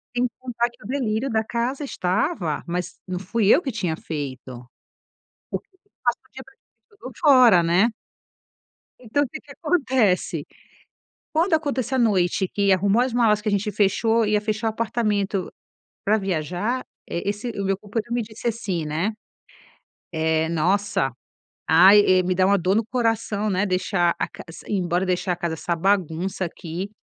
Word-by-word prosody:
Sem 245 +1 +2
contar 240 -2 -1
que 240 - -24
o - - -9
delírio 250 -2 -1
da 220 -2 +1
casa 240 +6 -2
estava, 185 - -1
mas 180 +1 -4
não 185 -1 -4
fui 200 +3 0
eu 345 - +4
que 280 - -3
tinha 180 -9 -2
feito. 130 -6 -6 0.9
Porque - - -5
eu 390 +2 -35
passo - - +1
o - - -31
dia - - -9
praticamente - - -24 0.2
todo 255 - -7
fora, 250 - +7
né. 175 +7 +3 1.1
Então, 255 +4 0
o - - -3
que - - -7
que 285 - -16
acontece? 265 - +1 0.9
Quando 330 +3 +2
acontece 280 -5 0
a 260 - +1
noite, 190 -4 +2
que 200 -1 +2
arrumou 200 +4 +3
as 255 0 0
malas, 220 -3 +3
que 210 - -1
a - - -1
gente 205 +1 0
fechou, 225 +3 +2
ia 210 0 +2
fechar 215 +1 -2
o - - +3
apartamento 210 -4 -1 0.5
para 215 +2 +3
viajar, 190 - -2 0.2
eh, 170 - -3
esse 205 +4 -2
o - - -1
meu 195 0 +1
companheiro 215 +3 -4
me 240 - +1
disse 220 +1 -6
assim, 210 -8 -2
né: 160 +8 -1 1.0
"Eh, 160 0 +1
nossa! 175 - +1 0.6
Ai, 185 +6 +8 0.2
eh, - - +1
me 185 0 0
dá 185 +1 +3
uma 200 +1 +4
dor 185 +2 +1
no 225 - +2
coração, 225 -3 0
né, 195 0 +1
deixar 185 -2 +1
a - - -1
cas - - -11
s 165 - -11
ir 210 - 0
embora, 180 0 0
deixar 180 0 0
a 175 - -2
casa 170 -2 -2
essa 170 +1 -2
bagunça 185 0 0
aqui". 175 +2 -6
205 Hz, 175 wpm, -23 LUFS, 180-235 Hz, 1.1 s, Ai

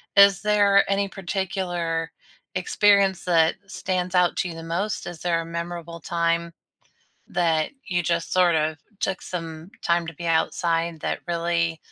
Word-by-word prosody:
Is 200 -1 +7
there 205 -2 +4
any 200 0 +1
particular 175 -3 -2 0.4
experience 200 - +3
that 165 -2 +4
stands 185 -2 -2
out 180 -1 +4
to 185 - 0
you 165 - -7
the 165 - -8
most? 185 +6 -2
Is 175 -2 -7
there 170 -1 0
a - - -7
memorable 170 0 -5
time 170 0 -1 0.8
that 165 -3 +1 0.2
you 175 -3 0
just 170 0 -1
sort 180 -2 +4
of 155 0 0 0.2
took 190 - -1
some 165 0 -6
time 170 0 +1
to 160 - -7
be 170 +2 -6
outside 165 0 0
that - - -2
really 170 -1 0
170 Hz, 150 wpm, -24 LUFS, 165-185 Hz, 0.8 s, Is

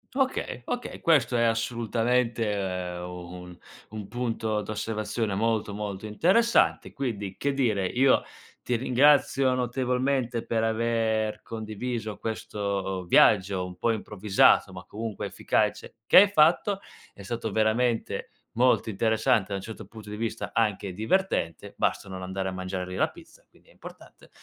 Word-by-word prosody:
Okay, 260 - -1
okay, 245 - -5
questo 150 -6 +3
è, 115 - +3
assolutamente, 115 0 0
uhm, 90 -2 -5
un 90 -1 -11 0.3
un 105 -2 -7
punto 115 -3 -2
d'osservazione 110 0 -3
molto, 110 -1 0
molto 105 -1 -5
interessante, 190 - +2
quindi, 105 -8 -4
che 140 - -1
dire, 110 -8 +1
io 130 +6 +3 0.4
ti 125 - 0
ringrazio 130 +1 +4
notevolmente 125 0 -1
per 110 -1 0
aver 110 -1 0
condiviso 110 0 -5
questo 100 -4 -3
viaggio, 95 0 +4
un 90 0 -8
po' 115 +5 +1
improvvisato 105 -2 +3
ma, 90 -1 -10
comunque, 110 -1 -5
efficace, - - -1
che - - +7
hai 205 - +4
fatto 190 +3 +3 0.3
è 100 - -13
stato 115 +1 -4
veramente 110 +3 0 0.2
molto 125 -1 +3
interessante, 110 +1 +2
da 100 - -2
un 95 - -4
certo 110 +1 -8
punto 110 -2 -12
di 105 - -5
vista 115 +1 -4
anche 105 -4 0
divertente, 110 - -1
basta - - 0
non 95 0 -6
andare 95 +1 -3
a - - -2
mangiare 95 0 -4
lì 90 - -6
la - - +1
pizza, - - -17
quindi - - -26
è - - -19
importante, - - -14
110 Hz, 140 wpm, -27 LUFS, 100-125 Hz, 0.4 s, che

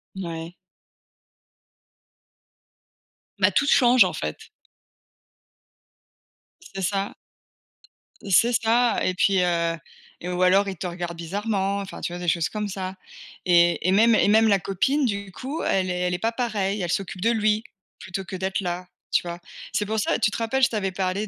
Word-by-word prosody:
Ouais. 170 -2 -6 2.9
Bah, - - +4
toutes 280 - +2
changent, 245 -3 +6
en - - -2
fait. 75 0 -4 2.4
C'est 195 - -5
ça 195 +2 -2 1.1
c'est 230 +6 +4
ça, 235 +1 +2
et 185 - +1
puis, 190 0 +2
heu, 170 -1 0 0.4
et 180 - -5
ou 180 0 -2
alors, 195 +2 +4
ils 190 - -6
te 180 - -4
regardent 175 -1 -5
bizarrement, 200 +3 -2
enfin, 195 -1 -7
tu 175 - -3
vois? 175 - -5
Des 175 - -5
choses 165 0 +1
comme 210 -1 -3
ça, 190 -1 -5 0.5
et 175 -1 +4
et 185 - +3
même 225 +3 +5
et 200 - +3
même 220 +1 +5
la 200 -2 +4
copine, 265 +10 0
du 200 -3 -3
coup, 275 +5 -5
elle 185 -1 +1
est 180 0 -2
elle 180 0 0
est - - 0
pas 225 +3 0
pareille, 210 -5 -2
elle 175 -2 -2
s'occupe 195 -1 -3
de 230 - +3
lui, 215 -1 +1 0.4
plutôt 190 +1 -5
que 190 - -7
d'être 190 +1 -2
là, 180 0 -4 0.2
tu - - +3
vois? 175 0 -6 0.3
C'est 210 - 0
pour 220 +1 -1
ça, 205 - +1
tu 210 - +2
te - - -4
rappelles, 235 +4 -1
je - - +6
t'avais 195 -4 -2
parlé 190 +3 -2
195 Hz, 170 wpm, -24 LUFS, 180-215 Hz, 2.9 s, changent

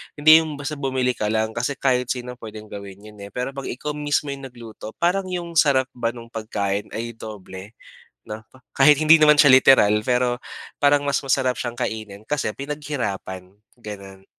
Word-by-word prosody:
hindi 155 +2 +7
yung 155 -2 -4
basta 145 +1 -6
bumili 130 -2 0
ka 105 -3 -3
lang 110 +1 0
kasi 125 +5 -2
kahit 125 -2 0
sino 125 -1 -5
pwedeng 110 -1 -10
gawin 100 0 -9
yun, 105 -1 -14
eh. 100 - -8
Pero 125 +2 -3
pag 135 0 -7
ikaw 150 +4 -4
mismo 145 -1 -1
yung 135 -1 -7
nagluto 115 -3 -11
parang 185 +3 0
yung 170 -3 -2
sarap 130 -3 +3
ba 120 0 -3
nung 115 0 -11
pagkain 105 -2 -3
ay 115 +1 -4
doble 105 -2 -10 0.5
'no 110 +1 -7
pa 130 - -19 0.2
kahit 145 +1 +6
hindi 155 +1 +7
naman 150 -1 +6
siya 145 - +7
literal 105 -5 +5
pero 125 -1 +1 0.4
parang 145 0 +3
mas 140 - +1
masarap 130 -1 +1
siyang 120 -1 -5
kainin 110 -1 -5
kasi 140 -7 -1
pinaghirapan 120 -10 -5 0.2
ganun. 100 -3 -10
125 Hz, 180 wpm, -22 LUFS, 110-145 Hz, 0.5 s, hindi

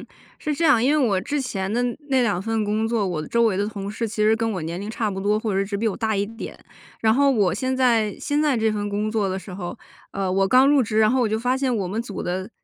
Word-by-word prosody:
嗯， - - -11 0.3
是 300 - -2
这 330 +4 -1
样， 260 -7 +5
因 265 - +3
为 265 - +3
我 195 -3 +1
之 290 +8 -2
前 195 -6 -3
的 240 - +1 0.3
那 265 -1 +3
2 200 -6 0
份 225 0 -1
工 215 +2 0
作， 225 -3 0
我 165 -4 -3
周 235 0 +2
围 215 -4 +2
的 200 - 0
同 200 -2 -6
事 225 +2 -3
其 215 - -8
实 215 +1 +4
跟 225 0 -1
我 185 -5 -3
年 170 +3 -4
龄 205 - -5
差 220 -1 -1
不 190 -1 -4
多， 205 +2 +1
或 215 -2 -2
者 195 +1 +1
只 200 0 -3
比 225 - -1
我 210 - -1
大 220 -3 -1
一 200 +1 0
点。 225 +1 -8 0.4
然 220 0 +3
后 280 +2 +4
我 200 -8 +2
现 260 +5 -1
在， 230 -5 +2
现 290 +1 -1
在 290 -4 +2
这 220 -1 +1
份 205 -1 -2
工 205 +1 -1
作 215 -3 0
的 190 - -2
时 190 -1 -9
候， 180 -2 -6 0.3
呃， 195 -1 -2
我 195 +1 +2
刚 255 +5 +6
入 285 -2 +5
职， 220 -1 -1
然 215 -1 +5
后 255 +2 +2
我 230 - +2
就 220 +1 0
发 250 +3 0
现 265 -2 0
我 200 -4 -1
们 215 +6 -3
组 205 -4 -7
的， 185 +4 -3
215 Hz, 315 characters per minute, -23 LUFS, 200-235 Hz, 0.4 s, 刚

